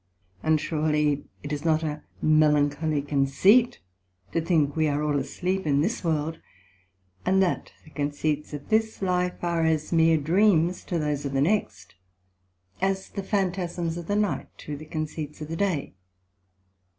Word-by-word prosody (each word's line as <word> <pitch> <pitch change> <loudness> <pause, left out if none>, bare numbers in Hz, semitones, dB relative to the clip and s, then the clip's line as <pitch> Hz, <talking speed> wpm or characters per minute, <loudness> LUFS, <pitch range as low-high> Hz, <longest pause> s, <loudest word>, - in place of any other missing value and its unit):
And 160 -1 +2
surely 150 -2 0 0.2
it 145 +1 -4
is 145 0 -4
not 160 -1 +2
a 150 -1 -3 0.2
melancholy 150 -1 +3
conceit 145 - +3 0.5
to 165 - 0
think 155 -4 +1
we 160 -1 +2
are 145 0 0
all 145 -1 +1
asleep 185 +6 -2
in 140 -1 +3
this 200 +7 -1
World, 160 -1 -1 0.8
and 190 +1 +3
that 180 - -1
the 155 - -17
conceits 145 +1 -2
of 145 -1 -8
this 220 -1 +1
life 180 -1 0
are 170 -1 +1
as 160 0 0
meer 165 0 +5
dreams 175 +2 +2
to 175 - -2
those 150 -2 -1
of 140 -1 -3
the 135 - +1
next, 205 +8 -1 0.9
as 195 0 0
the 200 - -4
Phantasms 180 -4 -1
of 170 -1 -7
the 205 - 0
night, 210 -1 0
to 150 - -6
the 150 +2 -9
conceits 155 -1 -5
of 150 0 -7
the 165 - -3
day. 175 - -1
160 Hz, 160 wpm, -26 LUFS, 150-180 Hz, 0.9 s, meer